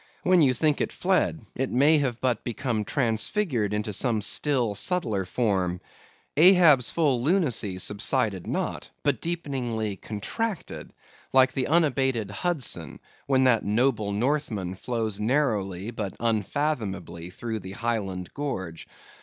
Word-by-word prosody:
When 180 -1 +4
you 130 -4 +4
think 150 +4 +1
it - - -1
fled, 185 -3 0
it 135 0 -2
may 145 +5 +4
have 125 -5 -2
but 125 -2 0
become 120 -2 -2
transfigured 120 - 0
into 105 0 -2
some 115 +2 +2
still 120 +1 +2
subtler 110 - 0
form. 95 -4 -1 0.6
Ahab's 160 -6 +6
full 145 -7 +1
lunacy 130 - 0
subsided 105 0 0
not, - - -3
but 140 -5 0
deepeningly 125 - -3
contracted; 185 - -4 0.4
like 130 0 +5
the 130 - -1
unabated 135 -9 +1
Hudson, 115 - 0 0.3
when 130 -1 +3
that 125 -3 +3
noble 110 -1 +1
Northman 105 -5 -1
flows 110 0 -3
narrowly, 105 -5 0
but 105 -5 -5
unfathomably 105 - -2
through 110 +4 -5
the 95 0 -8
Highland 100 -5 -3
gorge. 95 - -5
120 Hz, 125 wpm, -26 LUFS, 105-145 Hz, 0.6 s, Ahab's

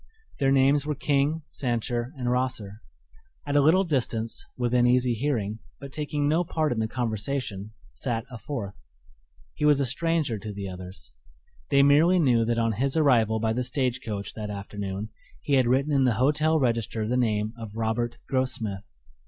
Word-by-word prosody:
Their 135 -2 +3
names 135 +1 +4
were 150 0 -2
King, 145 +3 0
Sancher, 120 -1 -2
and 125 -1 -1
Rosser. 115 -5 -2 0.6
At 145 0 -2
a 145 - +6
little 165 +7 +5
distance, 120 -8 -1
within 120 0 +2
easy 125 0 +3
hearing, 110 -4 -2 0.2
but 140 -1 -9
taking 150 -1 -1
no 160 +4 +2
part 155 -3 -1
in 120 - -1
the 110 - 0
conversation, 110 -3 -3 0.2
sat 115 - -2
a 120 - -7
fourth. 110 -10 -5 0.8
He - - -5
was 150 -2 +5
a 140 - +2
stranger 145 -3 0
to 105 +1 -6
the 100 -1 -5
others. 90 0 -8 0.6
They 140 0 +5
merely 155 +6 +5
knew 125 -9 +3
that 115 0 0
on 115 -1 +2
his 140 +3 +1
arrival 115 -7 +3
by 110 0 0
the 125 - -1
stage 125 0 -1
coach 100 -3 -4
that 105 -1 -5
afternoon 100 0 -5 0.3
he 145 - -3
had 130 -3 +4
written 135 +4 +2
in 135 -2 +3
the 120 -3 +2
hotel 150 +6 +2
register 115 -4 0
the 125 - 0
name 110 -3 0
of 110 -3 -9
Robert 115 +1 -1
Grossmith. 120 -7 -1
125 Hz, 175 wpm, -26 LUFS, 110-140 Hz, 0.8 s, a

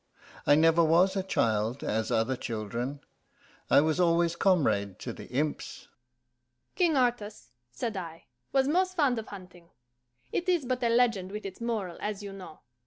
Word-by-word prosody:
I 145 - +7
never 165 +2 +4
was 175 +4 +4
a 195 - +1
child 120 - 0
as 110 0 -1
other 115 +4 +1
children. 120 +5 -4 0.7
I - - +6
was 155 +3 0
always 170 -1 +3
comrade 135 - +1
to - - -5
the - - -10
imps." 145 +3 -3 0.8
"King 345 -4 +2
Artus," 235 - -1 0.2
said 210 - -4
I, 165 -3 -7 0.3
"was 270 -1 +2
most 370 +4 +1
fond 265 -7 +2
of 220 - -8
hunting." 180 -3 -12 0.6
(It 355 - -1
is 345 -7 +2
but 255 0 -2
a 235 - +2
legend 230 -6 +2
with 210 0 -6
its 195 +3 -8
moral, 215 -7 -3
as 210 -1 -4
you 200 -1 -7
know.) 185 -5 -11
185 Hz, 165 wpm, -29 LUFS, 150-230 Hz, 0.8 s, I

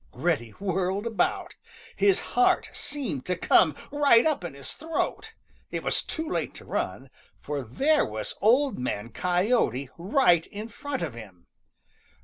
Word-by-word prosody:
Reddy 155 -9 0
whirled 190 +1 -1
about. 225 -3 -1 0.4
His 395 -2 +3
heart 370 0 +3
seemed 240 - -4
to 180 - +1
come 170 -1 +4 0.2
right 280 -5 +5
up 305 - +1
in 170 -5 -6
his 140 -2 -4
throat. 330 +7 -3 0.4
It - - -4
was - - +2
too 320 0 -3
late 355 - -2
to - - -12
run, - - -3 0.3
for 145 -1 -4
there 275 - +2
was 110 0 -4
Old 255 - +3
Man 115 -3 -3
Coyote 175 - +1
right 175 - +3
in 210 +3 -7
front 285 -5 -4
of 150 -7 -3
him. 100 -7 -12
190 Hz, 145 wpm, -27 LUFS, -, 0.4 s, right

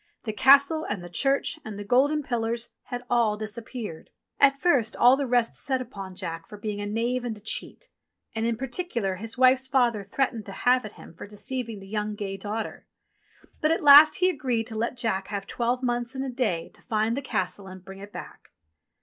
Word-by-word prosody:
the 215 - -3
Castle, 280 +6 +5
and 180 - -3
the 175 - -9
church, 275 - +1
and 215 -2 -7
the 205 - -5
golden 280 +7 +2
pillars, 235 -1 -1 0.2
had 245 0 -6
all 230 -4 +2
disappeared! 215 -4 -7 0.3
At 275 -1 +5
first 275 -10 +2
all 250 +2 +7
the 275 -1 -2
rest 240 -2 +2
set 265 -2 0
upon 200 -7 -8
Jack 165 -3 -6
for 210 - -10
being 205 0 -4
a 205 - -3
knave 235 +4 -1
and 230 -3 -4
a - - -11
cheat; 220 - -5 0.5
and, 225 +1 -1
in 230 -1 -1
particular, 240 - -3
his 225 +5 -6
wife's 260 +1 +4
father 245 -5 +2
threatened 220 +1 -2
to 195 - -7
have 250 0 +4
at 215 - -8
him - - -14
for - - -10
deceiving 215 +2 -5
the - - -11
gay 195 - -14
young 210 -1 -2 0.2
daughter; 215 +3 -5 0.7
but 310 - +3
at 325 - +1
last 295 +2 +9
he 365 +1 +3
agreed 255 -8 -1
to 220 - -6
let 235 +3 -2
Jack 205 -6 -1
have 200 -2 -4
twelve 245 +4 -1
months 240 0 -2
and 265 +1 -3
a - - -3
day 235 -10 -1
to - - -18
find 220 0 0
the 280 - -3
Castle 190 -6 -3
and 185 -1 -11
bring 195 0 -10
it 200 +1 -10
back. - - -10
235 Hz, 210 wpm, -26 LUFS, 210-260 Hz, 0.7 s, last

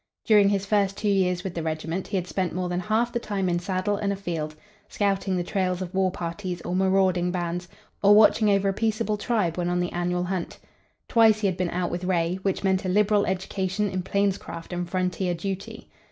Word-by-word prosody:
During 210 -3 +5
his 200 -1 0
first 200 -1 +1
two 210 - -2
years 180 -2 +1
with 190 - -4
the 170 - -3
regiment 160 +3 -3
he 195 - -1
had 180 - -2
spent 180 -2 -2
more 180 -1 -2
than 175 0 -1
half 220 +5 0
the 240 - 0
time 200 -4 -2
in 175 -1 +1
saddle 185 +2 -1
and 200 -1 -1
afield, 165 -6 -4 0.3
scouting 195 -2 0
the 175 - 0
trails 185 0 -1
of 185 0 -5
war 190 0 +2
parties 180 +1 -5
or 175 - -3
marauding 190 -2 +2
bands, 175 0 -3 0.3
or 205 +1 +7
watching 215 0 +5
over 200 0 +3
a 195 - +1
peaceable 220 0 0
tribe 205 -6 -1
when 175 0 0
on 180 0 0
the 175 0 -1
annual 180 0 -1
hunt. 180 -1 -3 0.5
Twice 220 -2 +4
he - - 0
had 190 -2 +1
been 180 -1 -1
out 175 0 -2
with 175 +1 -4
Ray, 180 0 0
which 195 0 -1
meant 190 -1 +2
a 185 - -2
liberal 205 +1 +3
education 190 +2 -1
in 185 - -2
plainscraft 190 -3 -2
and 175 0 -3
frontier 180 -1 -1
duty. 195 +2 -6
185 Hz, 210 wpm, -25 LUFS, 180-200 Hz, 0.5 s, or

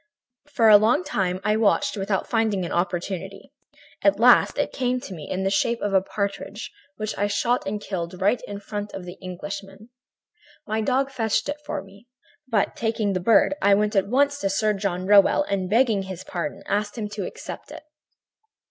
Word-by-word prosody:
"For 230 -6 +3
a 210 -1 +10
long 215 -3 +2
time 185 -1 -1
I 210 +1 +2
watched 220 0 +2
without 195 -1 -1
finding 220 -5 0
an - - -6
opportunity. 185 +2 -3 0.5
At - - +3
last - - +5
it - - 0
came 255 -1 -1
to 195 - -8
me 155 -4 -9
in 190 +1 -2
the 195 - 0
shape 235 +3 +1
of 205 -1 -2
a 190 - +5
partridge 200 +1 -4 0.3
which 215 0 -3
I 205 - +2
shot 235 +3 0
and 210 +2 -2
killed 180 -3 -5
right 210 +5 +2
in 205 0 -6
front 205 0 -6
of 190 - -7
the 180 +1 -10
Englishman. 195 +3 -8 0.8
My 220 0 -1
dog 270 +5 +1
fetched 225 -1 0
it 290 +1 -3
for 295 - -4
me, 200 +4 -18 0.4
but, 220 -5 0
taking 225 -3 -1
the 185 - 0
bird, 210 +8 +4
I 200 0 +5
went 210 +1 0
at 195 -1 +2
once 285 +5 +2
to 195 - 0
Sir 215 +2 +1
John 190 -2 -2
Rowell 200 +7 +5
and, 195 -9 -2
begging 225 -2 +3
his 190 -1 -7
pardon, 175 +2 -5
asked 205 +2 -2
him 215 -2 -3
to 205 -3 -4
accept - - -9
it. 315 - -10
205 Hz, 190 wpm, -24 LUFS, 190-220 Hz, 0.8 s, a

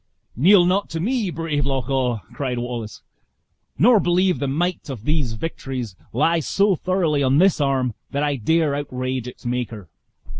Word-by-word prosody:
"Kneel 175 - +6
not 190 +3 +1
to 165 - -4
me, 225 +2 0
brave 160 -4 -2
Loch 135 -2 -1
awe!" 125 -5 0
cried 130 -3 -3
Wallace; 120 -3 -5 0.7
"nor 230 +2 +6
believe 180 0 +2
the 140 - -1
might 170 +5 -2
of 125 -6 -6
these 150 -5 0
victories 125 - -5 0.2
lies 160 +5 +1
so 200 0 +3
thoroughly 170 -4 0
on 135 0 +3
this 185 -2 +4
arm 130 -4 +1 0.2
that 140 +1 -1
I 145 -1 0
dare 155 +5 +1
outrage 130 -3 -3
its 125 - -11
Maker. 120 -6 -4
140 Hz, 160 wpm, -22 LUFS, 125-170 Hz, 0.7 s, Kneel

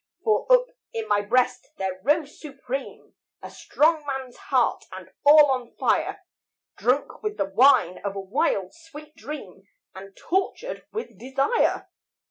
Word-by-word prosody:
For 440 +2 +1
up - - +6 0.3
in 450 -1 -4
my 205 - +2
breast 250 +4 +1
there 190 -1 -3
rose 295 - 0
supreme 275 -3 -7 0.3
A - - -8
strong 315 0 +1
man's 265 -3 -5
heart, - - 0
and - - -10
all 295 -1 +7
on 250 -2 -3
fire: 390 - 0 0.5
Drunk 255 +4 -1
with 425 -1 -4
the - - 0
wine 200 -3 +4
of 200 -1 -3
a - - -4
wild, 195 - -1
sweet 310 -2 -14
dream, 295 +7 -9 0.3
And 195 +1 -12
tortured 385 +7 -3
with 240 - -7
desire. 270 - 0
275 Hz, 140 wpm, -24 LUFS, 230-320 Hz, 0.5 s, all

